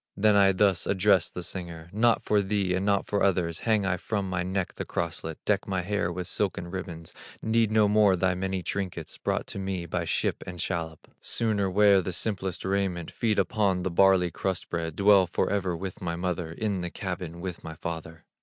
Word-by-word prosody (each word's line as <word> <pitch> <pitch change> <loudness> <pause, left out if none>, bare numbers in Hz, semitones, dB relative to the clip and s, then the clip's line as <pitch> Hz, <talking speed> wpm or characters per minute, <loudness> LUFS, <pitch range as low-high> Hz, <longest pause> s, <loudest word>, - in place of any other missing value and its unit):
Then 105 +1 +4
I 100 -1 +6
thus 95 -2 +2
addressed 95 -2 +3
the 90 - -4
singer: 85 -3 -6
'Not 115 +2 +3
for 105 -1 +3
thee 100 -2 0
and 95 +1 0
not 100 -1 +2
for 100 - -1
others, 90 -3 +1
Hang 105 -3 +3
I 95 -1 +1
from 100 +1 -2
my 95 -1 -1
neck 95 +1 -2
the - - -5
crosslet, 80 -1 -3
Deck 105 -1 +1
my 95 -2 0
hair 100 -2 -1
with 90 +1 -4
silken 90 -2 -2
ribbons; 85 -3 -6 0.3
Need 110 0 +2
no 110 -1 +4
more 105 -2 +5
the 95 0 +1
many 95 0 -2
trinkets, 90 -5 -4
Brought - - -1
to - - -6
me 95 -2 -3
by 85 +1 -2
ship - - -1
and 90 0 -7
shallop; 80 -3 -3
Sooner 105 -4 0
wear 100 0 +5
the 95 0 -4
simplest 95 -3 -3
raiment, 95 -3 -1
Feed 110 -3 0
upon 100 -2 +1
the 95 - -1
barley 95 -1 +4
bread - - -33
crust, 95 -1 -3 0.2
Dwell 100 -1 +5
forever 90 0 0
with 95 +1 -6
my 85 -1 -2
mother 90 -2 -2
In 100 +1 -2
the 90 - -3
cabin 90 -2 -5
with 90 -1 -6
my 80 0 -7
father. 80 +1 -6
95 Hz, 200 wpm, -27 LUFS, 85-100 Hz, 0.3 s, I